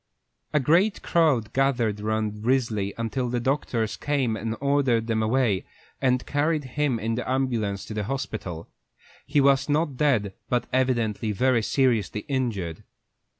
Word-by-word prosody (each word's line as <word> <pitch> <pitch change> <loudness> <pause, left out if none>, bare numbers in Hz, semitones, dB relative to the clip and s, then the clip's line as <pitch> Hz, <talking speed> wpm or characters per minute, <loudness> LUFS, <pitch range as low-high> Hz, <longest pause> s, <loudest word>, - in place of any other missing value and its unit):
A 150 - +3
great 175 - +2
crowd 135 -10 +2
gathered 120 -6 +1
around 110 -1 -2
Risley 115 -5 +1
until 120 +2 -2
the 120 0 -1
doctors 120 -4 -1
came 135 -6 0
and 110 +1 -3
ordered 140 -5 +2
them 110 -1 0
away, 110 -3 +1 0.4
and 125 -1 +2
carried 150 +1 0
him 135 0 -1
in 115 +1 -2
the 125 +2 -3
ambulance 120 -7 -1
to - - -7
the 105 -1 -2
hospital. 105 -9 -4 0.6
He 145 +1 +2
was 140 0 +3
not 150 -2 +1
dead, 120 -10 +2 0.2
but 125 -1 +1
evidently 120 -4 +1
very 125 +3 +2
seriously 115 -4 +1
injured. 110 - -2
125 Hz, 145 wpm, -25 LUFS, 110-135 Hz, 0.6 s, A